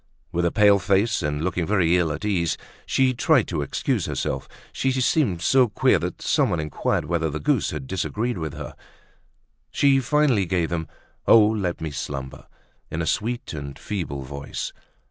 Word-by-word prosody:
With 85 +1 0
a 85 - +2
pale 105 -2 +5
face, 100 +4 +2
and 75 +1 -2
looking 90 -2 -1
very 90 -5 +3
ill 85 -3 +2
at 80 +7 -5
ease, 85 -6 0 0.3
she 130 -1 +2
tried 125 0 +3
to 80 -4 -1
excuse 70 - -1
herself; - - -3 0.2
she 135 - 0
seemed 125 - +1
so 130 +4 +5
queer 105 - +3
that - - -5
someone 85 - +2
inquired 75 -1 -1
whether 80 0 0
the 75 +1 -4
goose 75 - +1
had 75 -3 -5
disagreed 105 - -2
with 80 -1 -4
her. 75 -3 -7 1.0
She 140 -1 +3
finally 130 - +2
gave 85 -2 0
them 80 -2 -3 0.4
"Oh! 110 -2 +8
let 105 -5 -1
me 80 -2 -3
slumber!" 70 -2 -6 0.4
in 80 +2 -2
a - - -2
sweet 120 +6 -2
and 70 -2 -6
feeble 80 -9 -4
voice. 70 +1 -6
90 Hz, 170 wpm, -24 LUFS, 75-110 Hz, 1.0 s, Oh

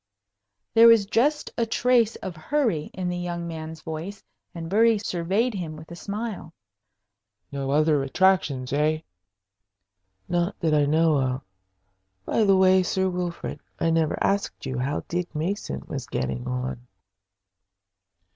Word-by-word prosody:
There 230 +1 +8
was 230 -3 +7
just 270 +9 +1
a 230 - +1
trace 235 -1 +3
of 185 -3 -6
hurry 205 - 0
in 185 -1 -4
the 180 0 -2
young 175 -1 -4
man's 160 -1 -7
voice, 165 +6 -6 0.3
and 165 -1 -5
Bury 225 +4 +4
surveyed 200 +5 0
him 170 -6 -5
with 155 +2 -12
a - - -6
smile. 200 -3 -5 1.0
"No 140 -1 -3
other 150 0 +3
attractions, 140 -4 +1
eh?" 155 +2 +1 1.3
"Not 175 +3 -1
that 160 -2 +1
I 145 -1 +4
know 155 0 +3
of. 130 0 -1 0.8
By 220 - +2
the 195 -1 +5
way, 185 0 +5
Sir 190 +1 0
Wilfrid, 175 -1 -4 0.2
I 165 - +2
never 160 -2 +1
asked 200 +1 -1
you 130 -1 -3
how 140 +4 -1
Dick 175 -1 -3
Mason 155 - -3
was - - -5
getting 65 - -3
on?" 125 -1 -4
170 Hz, 140 wpm, -25 LUFS, 155-200 Hz, 1.3 s, There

